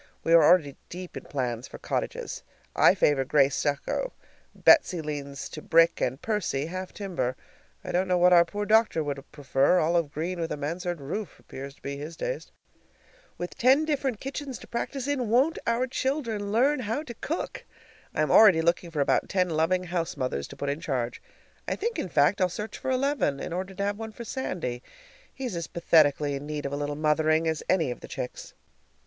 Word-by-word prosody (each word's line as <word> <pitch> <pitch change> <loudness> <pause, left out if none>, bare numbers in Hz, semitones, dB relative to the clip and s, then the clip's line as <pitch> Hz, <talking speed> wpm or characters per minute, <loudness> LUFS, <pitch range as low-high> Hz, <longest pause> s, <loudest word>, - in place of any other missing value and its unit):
We 165 - +2
are 165 -1 +8
already 150 -3 +4
deep 180 0 -8
in - - -7
plans 125 -3 -3
for - - -10
cottages. - - -3 0.3
I - - +6
favor 145 -2 +3
gray 140 0 +4
stucco, 145 - -2 0.4
Betsy 235 - +5
leans 145 -3 -5
to 155 - -8
brick, 165 +2 +4
and 130 +2 0
Percy, 200 -10 -1
half 185 +3 -5
timber. 170 -11 -3 0.5
I - - -5
don't 185 +2 +1
know 180 -1 +2
what 180 +1 +5
our 170 -1 +8
poor 205 +4 -4
doctor 215 -7 +3
would 140 -2 -4
prefer; 145 +3 +2
olive 165 -2 +1
green 170 +4 -3
with 165 -1 -2
a - - -2
mansard 170 +4 -3
roof 180 +9 -5
appears 135 +1 -9
to - - -29
be 140 0 -4
his 155 +3 -7
taste. - - -4 0.9
With 175 - -5
ten 265 +5 +4
different 270 -7 -1
kitchens 270 -1 -5
to - - -13
practice 260 +3 -3
in, 260 -6 -1
won't 265 +8 +3
our 235 +2 +2
children 245 -6 -2
learn 265 +6 +3
how 240 +5 -2
to 245 - -8
cook! 310 +8 -4 0.5
I - - +2
am - - 0
already 190 -7 +7
looking 170 +1 +1
about 140 - +3
for - - -19
ten 180 -3 +1
loving 165 +4 +1
house 175 -2 -3
mothers 125 - -2
to - - -11
put 140 - -3
in 145 +3 -3
charge. 130 -8 -2 0.5
I - - 0
think, 455 -3 -2
in 185 - -3
fact, 165 +7 +3
I'll 185 - +3
search 210 +4 -6
for - - -4
eleven, 260 - +1
in - - -5
order 185 +2 -4
to 200 - -2
have 205 +1 -1
one 220 -1 -6
for 235 - -8
Sandy. 175 - -4 0.5
He's 255 -8 -5
as 170 -1 -3
pathetically 150 -4 +3
in 140 +1 -5
need 150 -1 -4
of 140 - -3
a - - -1
little 145 0 -2
mothering 155 +1 +2
as 160 -1 -1
any 165 -8 +2
of - - -6
the - - -10
chicks. 125 - -6
175 Hz, 200 wpm, -27 LUFS, 145-220 Hz, 0.9 s, are